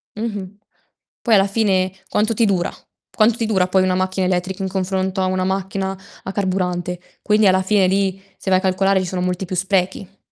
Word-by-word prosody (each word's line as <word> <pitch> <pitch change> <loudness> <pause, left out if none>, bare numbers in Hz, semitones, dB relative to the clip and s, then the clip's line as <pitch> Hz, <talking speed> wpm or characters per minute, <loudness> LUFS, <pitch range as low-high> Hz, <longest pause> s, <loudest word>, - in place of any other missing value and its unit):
Mh-mh. 205 -3 -5 0.6
Poi 230 -3 +4
alla 195 0 +4
fine 195 -3 +1 0.2
quanto 215 +2 +1
ti 230 +1 +2
dura? 185 -4 +1 0.4
Quanto 215 +1 +4
ti 230 - -1
dura 190 -4 +2
poi 185 0 +3
una 185 -1 +1
macchina 185 0 0
elettrica 185 +1 -1
in 190 - -2
confronto 190 0 -1
a - - +2
una 185 0 0
macchina 190 0 -2 0.3
a 190 - -4
carburante? 180 -2 -1 0.2
Quindi 210 -1 +3
alla 190 0 +4
fine 195 0 +3
lì, 195 0 0 0.2
se 190 - -5
vai 185 0 +4
a - - -6
calcolare, 195 0 +2
ci - - -3
sono 180 0 -3
molti 180 +1 -1
più 185 - -4
sprechi. 190 +1 -1
190 Hz, 200 wpm, -20 LUFS, 185-200 Hz, 0.6 s, Poi